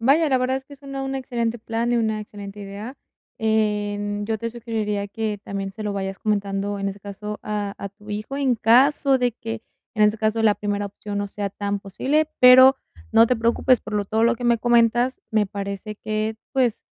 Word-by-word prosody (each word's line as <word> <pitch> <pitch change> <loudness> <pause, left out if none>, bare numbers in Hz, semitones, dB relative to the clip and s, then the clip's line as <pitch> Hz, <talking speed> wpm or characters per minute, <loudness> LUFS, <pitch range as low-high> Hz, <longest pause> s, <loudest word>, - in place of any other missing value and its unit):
Vaya, 290 +7 +4
la 260 - +3
verdad 255 +1 0
es 265 - -7
que 285 +1 -13
suena 275 -1 -6
un 270 0 -3
excelente 240 -3 -2
plan 230 +2 -2
y - - +3
una 220 -2 0
excelente 205 -1 -9
idea. 205 +6 -7 0.4
Em, 205 -1 0
yo 220 0 -2
te 230 +2 -3
sugeriría 220 -3 -3
que 215 0 -3
también 195 -1 -4
se 215 - -8
lo 205 -1 -2
vayas 195 -1 -4
comentando, 200 -1 -1
en 195 - -1
ese 195 +1 -7
caso, 210 +1 -6
a 205 -1 -3
a 200 - -5
tu 205 +2 -14
hijo, 215 +7 -4
en 270 -3 +2
caso 265 +4 +4
de 245 -2 +1
que, 225 -1 -6 0.3
en 215 - +3
este 210 +1 +4
caso, 220 +1 +1
la 210 -2 +5
primera 205 -1 -2
opción 205 +1 -6
no 205 0 -2
sea 200 0 -4
tan 200 0 -3
posible, 275 +11 0
pero 260 +1 +9 0.3
no 230 - +6
te 250 +1 +1
preocupes 235 +2 +2
por 215 - -9
lo 205 -1 +1
todo 220 +3 +1
lo 235 0 +4
que 245 - -6
me 235 -1 +3
comentas, 240 +2 +3
me 215 -2 +2
parece 200 +1 -5
que, 215 +1 -2 0.2
pues, 250 -4 +1
220 Hz, 210 wpm, -23 LUFS, 205-240 Hz, 0.4 s, pero